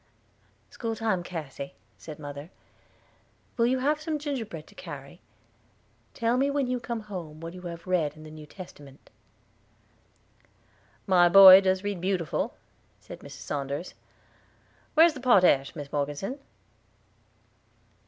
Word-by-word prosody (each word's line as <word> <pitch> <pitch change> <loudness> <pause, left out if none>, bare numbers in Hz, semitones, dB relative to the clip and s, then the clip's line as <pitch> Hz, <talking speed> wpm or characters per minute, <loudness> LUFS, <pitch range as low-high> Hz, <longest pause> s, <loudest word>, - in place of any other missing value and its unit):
"School 225 -2 -4
time, 220 -5 0
Cassy," 150 -5 -7 0.2
said 155 -2 -10
mother. 145 +1 -8 1.1
"Will 230 -1 +2
you 260 +2 +2
have 295 +4 0
some 310 0 -2
gingerbread 235 - -5
to - - -19
carry? - - -10 0.9
Tell 230 +1 +1
me 275 +2 +2
when 280 -1 0
you 250 0 -2
come 235 -1 -4
home 175 -7 -8
what 165 +1 -7
you 180 - -10
have 170 -2 -8
read 165 -5 0
in 155 - -12
the 155 - -11
New 155 -1 -11
Testament." 145 -6 -13 1.9
"My 175 -2 +5
boy 190 0 +11
does 190 0 +1
read 200 -3 -3
beautiful," 180 -4 -1 0.4
said - - -11
Mrs. - - -11
Saunders. 140 +4 -4 1.0
"Where's 325 +1 +6
the 280 - -8
potash, 180 - +4
Mis 145 -3 -8
Morgeson?" 145 - -3
185 Hz, 130 wpm, -27 LUFS, 155-235 Hz, 1.9 s, boy